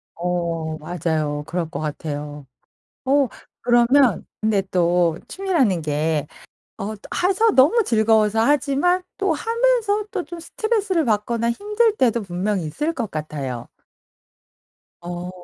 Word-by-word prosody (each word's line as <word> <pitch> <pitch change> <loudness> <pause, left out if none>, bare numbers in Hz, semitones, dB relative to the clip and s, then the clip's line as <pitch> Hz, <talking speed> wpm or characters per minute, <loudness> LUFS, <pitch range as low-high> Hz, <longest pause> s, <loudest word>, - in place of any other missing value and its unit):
어. 170 -2 -2
맞아요. 155 -2 -2
그럴 170 -2 -2
것 170 - -5
같아요. 150 -1 -5 0.6
어 275 +1 +3 0.3
그러면 240 -1 +4 0.2
근데 215 -2 +2
또 175 -2 +2
취미라는 315 - +1
게 150 0 -1 0.5
어 210 +2 -3 0.3
해서 415 +4 +3
너무 325 - +5
즐거워서 220 - +3
하지만 290 +7 +2
또 390 -4 +1
하면서 455 0 +1
또 380 - -1
좀 340 +3 -8
스트레스를 400 -1 -1
받거나 230 +1 0
힘들 420 - +1
때도 235 - +2
분명히 190 -1 -2
있을 300 - -2
것 235 -10 -4
같아요. 140 -6 -5 1.3
어. 175 +1 -5
220 Hz, 240 characters per minute, -22 LUFS, -, 1.3 s, 너무